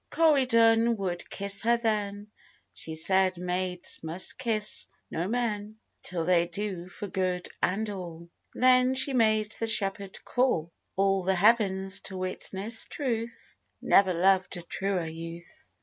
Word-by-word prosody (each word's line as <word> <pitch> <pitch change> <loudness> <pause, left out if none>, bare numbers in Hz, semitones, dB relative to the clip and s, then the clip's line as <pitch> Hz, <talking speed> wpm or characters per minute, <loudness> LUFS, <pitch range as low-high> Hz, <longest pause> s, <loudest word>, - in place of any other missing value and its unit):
Corydon 235 -7 +3
would 180 -3 -4
kiss 200 0 +2
her 235 +1 +2
then, 210 -2 -3 0.4
She 160 - -8
said, 185 +2 +3
maids 180 0 -2
must 165 +8 0
kiss 220 -4 +2 0.2
no 170 +3 -2
men, 215 -2 -3 0.2
Till 170 -3 -3
they 175 -1 +2
do 180 -1 -5
for 195 +3 -8
good 185 -2 -2
and 210 +4 0
all; 170 -4 -8 0.3
Then 255 0 +4
she 265 +1 +3
made 215 -3 +2
the 225 - -1
shepherd 200 -2 +1
call 245 -11 0 0.2
All 195 0 +1
the 190 +1 0
heavens 195 -1 +2
to 190 - -7
witness 190 +4 -2
truth, 235 -5 -5 0.2
Never 190 -3 +3
loved 185 +1 +2
a 175 - -8
truer 190 0 -2
youth. 165 - -9
195 Hz, 135 wpm, -27 LUFS, 180-225 Hz, 0.4 s, Then